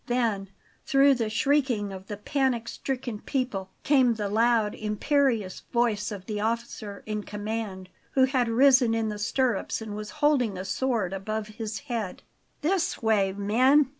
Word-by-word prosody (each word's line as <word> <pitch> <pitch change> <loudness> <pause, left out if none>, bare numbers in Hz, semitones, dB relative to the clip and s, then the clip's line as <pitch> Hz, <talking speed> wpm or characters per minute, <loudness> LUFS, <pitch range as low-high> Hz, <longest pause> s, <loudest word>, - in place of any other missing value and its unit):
Then, 225 -6 0 0.3
through 280 -2 +5
the 230 -4 -1
shrieking 235 -3 +1
of 190 0 -9
the 205 - -5
panic 250 0 0
stricken 250 -5 -4
people, 230 -9 -2
came 260 -5 +4
the 205 -2 -2
loud, 225 0 +2
imperious 215 -1 0
voice 230 -4 +1
of 195 -3 -7
the 210 -2 -3
officer 220 -2 -3
in 215 -1 -3
command, 205 -2 -5 0.3
who 265 - +4
had 260 -2 +2
risen 255 -1 +5
in 225 -1 0
the 210 -1 -5
stirrups 240 0 0
and 220 -2 -6
was 210 0 -6
holding 290 - +1
a 185 - -5
sword 200 -1 -1
above 215 +2 -3
his 220 +1 -5
head. 230 -9 -4 0.4
"This 350 -5 0
way, 205 -3 +3
men!" 250 +8 +3
225 Hz, 155 wpm, -27 LUFS, 205-260 Hz, 0.4 s, through